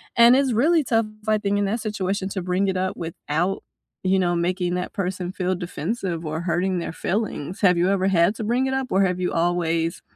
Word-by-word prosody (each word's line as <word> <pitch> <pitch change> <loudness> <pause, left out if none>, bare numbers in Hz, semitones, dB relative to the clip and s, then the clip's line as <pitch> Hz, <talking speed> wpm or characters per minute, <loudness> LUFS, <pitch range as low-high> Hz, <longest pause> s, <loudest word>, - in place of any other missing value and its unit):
and 235 +1 +7
it's 270 -3 +2
really 310 +7 +3
tough, 225 -3 +1 0.2
I 215 -1 +3
think, 200 0 0
in 205 - +1
that 220 +4 -1
situation 195 -2 -2
to 190 -2 -4
bring 185 +2 0
it 190 -1 0
up 185 0 -1
without, 165 +2 -2 0.4
you 190 +1 +2
know, 175 -1 +1
making 175 +1 0
that 180 0 -4
person 180 -1 -3
feel 185 -1 -1
defensive 175 0 -3
or 155 +1 -3
hurting 180 +1 0
their 170 - -5
feelings. 190 -2 -3
Have 180 -3 +5
you 180 +2 +2
ever 195 -1 +1
had 175 +2 +3
to 220 - -5
bring 245 +4 +1
it 265 - -1
up 265 -1 -1
or 195 +1 +3
have 180 -1 0
you 180 - -1
always 165 -1 0
185 Hz, 220 wpm, -23 LUFS, 175-210 Hz, 0.4 s, and